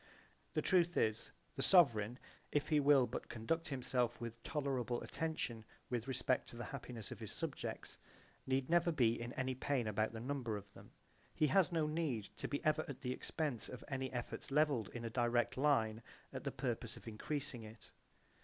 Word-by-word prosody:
The - - +2
truth 175 -2 +4
is, 110 0 +1 0.2
the - - -2
sovereign, 125 - +5 0.3
if 145 - +1
he 150 - +5
will 140 -2 +6
but - - -5
conduct 140 +9 -1
himself 125 -4 0
with 120 0 -6
tolerable 130 -5 -1
attention 155 -8 -2 0.3
with 120 0 -1
respect 130 -1 +1
to - - -8
the 120 - -4
happiness 125 -5 -6
of - - -6
his - - -6
subjects - - -4 0.5
need 130 0 +1
never 170 0 +4
be 120 -7 +3
in 120 +1 -4
any 130 0 -1
pain 130 -1 0
about 110 +1 +1
the 110 - -6
number 125 -3 -2
of 100 0 -11
them. - - -13 0.5
He 155 - +4
has 190 -2 +5
no 165 -2 +2
need 150 -9 -1
to - - -2
be 145 - -3
ever 155 0 +3
at 140 -2 -7
the 125 -3 -1
expense 145 -5 -2
of 125 - -7
any 130 -1 -2
efforts 120 -2 -4
levelled 140 -6 +3
in 120 -1 -6
a - - -1
direct 120 0 +2
line 115 -6 +2 0.3
at - - -5
the - - 0
purpose - - -3
of - - -13
increasing 135 +3 -3
it. 110 0 -11
130 Hz, 185 wpm, -38 LUFS, 115-145 Hz, 0.5 s, will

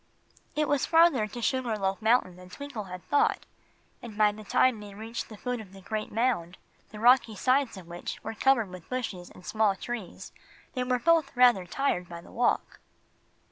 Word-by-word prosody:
It 305 0 +1
was 285 -2 +1
farther 325 -9 +5
to 235 +3 -7
Sugar 250 -4 0
Loaf 195 +1 -1
Mountain 220 -5 +2
than 180 0 -13
Twinkle 265 -1 -7
had 180 -1 -8
thought, 290 - +2 0.6
and 220 -3 -9
by 210 -1 +5
the 215 +1 -10
time 235 +2 +2
they 205 -1 -10
reached 225 +2 -6
the 215 - -10
foot 250 +1 -3
of 195 -3 -14
the 195 - -12
great 215 +2 -4
mound, 220 -8 0 0.3
the 210 - -10
rocky 240 -1 +5
sides 255 +1 +1
of 185 - -10
which 175 +1 -6
were 225 - -4
covered 230 -2 +2
with 180 -3 -11
bushes 220 -8 -4
and 180 - -15
small 215 -3 +2
trees, 225 -2 -7 0.4
they 255 - -1
were 250 0 +1
both 315 +1 +2
rather 240 -8 +5
tired 180 -5 -1
by 170 0 -7
the 170 - -15
walk. 245 - 0
220 Hz, 190 wpm, -28 LUFS, 195-255 Hz, 0.6 s, farther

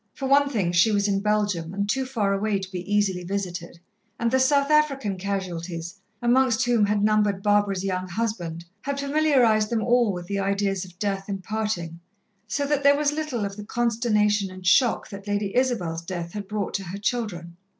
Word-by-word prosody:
For 270 - -3
one 280 +1 +4
thing, 200 -10 0
she 175 +5 +4
was 205 -1 +2
in 195 -1 +1
Belgium 205 -5 0
and 200 0 -1
too 260 +5 0
far 215 -7 0
away 205 +1 0
to 190 -1 -7
be 185 +2 -6
easily 195 -3 +1
visited, 175 -2 -4 0.4
and 235 0 +1
the 260 - +3
South 280 +2 +3
African 275 -9 +2
casualties, 180 -3 -4 0.3
amongst 240 -1 +3
whom 235 -4 +3
had 205 0 +1
numbered 210 -2 +2
Barbara's 205 -2 +2
young 185 -1 -2
husband, 175 -5 -3 0.2
had 280 0 -3
familiarized 275 -7 +3
them 225 -2 0
all 240 -3 +3
with 175 -2 -5
the 200 +2 -2
ideas 195 -1 0
of 180 -1 -16
death 195 -1 -2
and 195 -1 -4
parting, 185 -6 -3 0.5
so 285 +7 -1
that 285 0 +1
there 285 0 +5
was 295 -1 +2
little 295 -8 -2
of 200 0 -5
the 210 - -6
consternation 215 -3 +1
and 185 0 -11
shock 235 +6 +3
that 200 0 -9
Lady 205 0 -1
Isabel's 225 -11 0
death 170 -1 -5
had 205 -2 -5
brought 210 -1 -3
to 195 - -2
her 180 +3 -6
children. 200 -6 -3
205 Hz, 190 wpm, -25 LUFS, 190-240 Hz, 0.5 s, there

